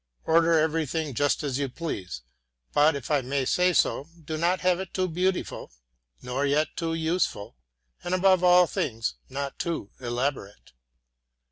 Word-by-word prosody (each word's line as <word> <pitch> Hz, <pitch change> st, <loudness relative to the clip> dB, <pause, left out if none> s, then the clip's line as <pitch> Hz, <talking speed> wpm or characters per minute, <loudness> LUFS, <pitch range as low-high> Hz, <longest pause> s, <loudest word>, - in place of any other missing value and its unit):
Order 165 Hz, 0 st, +4 dB
everything 155 Hz, -1 st, 0 dB
just 145 Hz, +5 st, +1 dB
as 140 Hz, -2 st, -2 dB
you 140 Hz, -1 st, -1 dB
please; 95 Hz, -, -5 dB, 0.5 s
but, 150 Hz, +1 st, +4 dB
if 140 Hz, +1 st, -6 dB
I 145 Hz, -2 st, +3 dB
may 135 Hz, +1 st, -1 dB
say 180 Hz, +6 st, +3 dB
so, 160 Hz, -3 st, +1 dB, 0.2 s
do 155 Hz, -, -3 dB
not 175 Hz, +3 st, +1 dB
have 180 Hz, -1 st, +2 dB
it 190 Hz, -2 st, -7 dB
too 185 Hz, -1 st, +1 dB
beautiful, 180 Hz, -, -2 dB, 0.5 s
nor 125 Hz, +3 st, -2 dB
yet 145 Hz, +2 st, +1 dB
too 165 Hz, -1 st, -2 dB
useful, 160 Hz, -, -1 dB, 0.5 s
and, 175 Hz, +1 st, 0 dB
above 185 Hz, -1 st, +4 dB
all 180 Hz, 0 st, +7 dB
things, 115 Hz, -8 st, -2 dB, 0.2 s
not 140 Hz, +1 st, -5 dB
too 165 Hz, -, -3 dB
elaborate. 120 Hz, -, -4 dB
155 Hz, 150 wpm, -26 LUFS, 135-175 Hz, 0.5 s, all